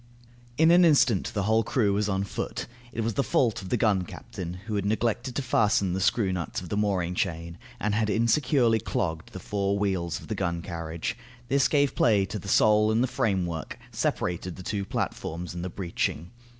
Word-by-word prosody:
In 160 +1 +6
an 175 +1 +7
instant 135 - +4
the 100 - 0
whole 110 +3 +3
crew 105 -6 +1
was 105 +1 0
on 95 0 0
foot. 100 - -4 0.3
It 115 - -3
was 115 0 -1
the 140 - +1
fault 115 -8 +1
of 95 - -8
the 125 - +1
gun 105 -4 +2
captain, 90 0 -7
who 110 - -4
had 100 -2 0
neglected 115 +4 -1
to 140 - -1
fasten 105 -6 +2
the 95 - -1
screw 100 -1 +2
nut 85 -2 -3
of 90 - -9
the - - -2
mooring 95 -4 0
chain, 85 -2 -3 0.2
and 105 0 0
had 110 0 +1
insecurely 115 +1 +3
clogged 80 -5 -3
the - - -7
four 100 -1 -1
wheels 95 -4 -1
of - - -12
the 110 - -2
gun 85 -4 -2
carriage; 85 -1 -4 0.3
this 135 0 +4
gave 145 -2 +2
play 105 -5 +3
to 105 +2 -5
the 100 - -10
sole 105 +2 +4
and 115 +3 +2
the - - +1
framework, 95 -11 -2
separated 90 0 -2
the 95 - -9
two 100 +1 -2
platforms, 85 -2 -4
and 85 0 -5
the 95 - -3
breeching. 85 -1 -3
100 Hz, 200 wpm, -27 LUFS, 90-115 Hz, 0.3 s, an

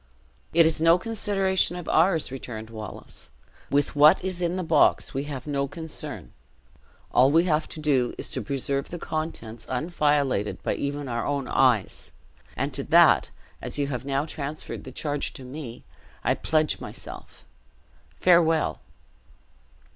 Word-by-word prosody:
"It 165 0 +6
is 160 -1 +1
no 165 +1 +6
consideration 195 -3 +1
of 175 -3 -7
ours," 165 -3 +2
returned 115 -4 -7
Wallace. 110 -3 -8 0.4
"With 145 +1 +1
what 150 +3 +6
is 185 -1 -3
in 175 0 0
the 185 - -2
box 160 -3 +3
we 135 +1 -2
have 135 -3 -6
no 140 -2 -1
concern; 150 - -7 0.8
all 130 +2 +5
we 165 +4 +4
have 155 -3 0
to - - -8
do 140 -5 +1
is, - - -5
to - - -2
preserve 140 0 -2
the 175 - -5
contents 155 -9 -5
unviolated 145 - 0
by - - 0
even 145 0 -3
our 120 -2 -2
own 140 -2 -2
eyes; 125 -7 +1 0.4
and - - -1
to - - -3
that, - - +5 0.3
as - - -5
you 145 - +1
have 125 -3 -3
now 140 +1 -1
transferred 155 -1 -6
the 130 - -8
charge 145 +1 -2
to 130 - -9
me, 125 -2 -8 0.4
I - - +3
pledge 155 -1 0
myself - - -10 0.7
farewell." 165 -3 +3
145 Hz, 150 wpm, -26 LUFS, 135-165 Hz, 0.8 s, It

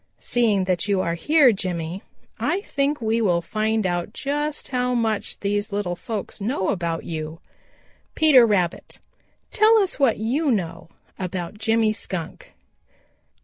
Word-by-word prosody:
Seeing 220 -5 +1
that 185 0 -1
you 200 -2 +2
are 170 -2 -1
here, 285 - +4
Jimmy, 180 -2 -3 0.4
I 375 +3 0
think 285 -5 -1
we 225 +1 +1
will 175 -5 +2
find 220 +3 -1
out 175 +3 -2
just 295 +3 -3
how 250 -1 0
much 220 -3 -1
these 205 +2 -1
little 200 -3 -2
folks 210 0 -6
know 200 -2 -1
about 170 -3 -2
you. 160 0 -5 0.8
"Peter 300 -6 +7
Rabbit, 180 -5 -1 0.5
tell 435 +2 +5
us 390 -6 0
what 265 -5 +3
you 265 +8 0
know 170 -8 -2 0.3
about 185 +1 -5
Jimmy 225 -1 +2
Skunk." 180 -6 -6
210 Hz, 140 wpm, -23 LUFS, 180-250 Hz, 0.8 s, Peter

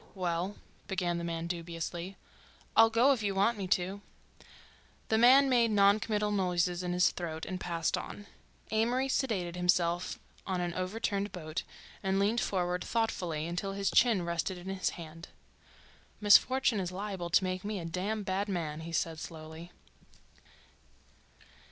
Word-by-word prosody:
"Well—" 180 +1 -2 0.3
began 175 -3 -1
the - - -5
man 165 -1 -3
dubiously. 170 +2 -5 0.6
"I'll 225 0 +7
go 240 +5 +4
if 245 - -3
you 200 -2 -1
want 200 +5 +3
me 190 - -3
to." 190 +2 0 1.1
The 220 - +3
man 265 +4 +7
made 240 -3 +4
non 200 0 +5
committal 210 -1 -1
noises 180 -2 +1
in 180 -1 -3
his 180 0 +4
throat 160 -2 -5
and 185 -1 -4
passed 170 -2 -1
on. 205 - -7 0.5
Amory 240 +4 +1
seated 205 -11 -1
himself 180 0 +1 0.3
on 185 -2 -1
an 175 -1 -2
overturned 200 +2 -2
boat 160 -1 -4 0.4
and 190 0 0
leaned 210 +4 +2
forward 180 -1 -1
thoughtfully 180 -9 -1
until 180 +3 -3
his 195 0 -1
chin 225 -8 +4
rested 170 +2 -2
in 180 +2 -8
his 195 -1 -1
hand. 165 0 -9 0.9
"Misfortune 230 +3 +5
is 180 -2 -3
liable 190 -2 -4
to 190 +3 +4
make 185 0 -2
me 210 0 -3
a 170 - -6
damn 195 +6 -2
bad 195 +2 -1
man," 160 -5 -3
he 165 +1 -7
said 165 0 -1
slowly. 160 +2 -9
185 Hz, 150 wpm, -31 LUFS, 175-205 Hz, 1.1 s, I'll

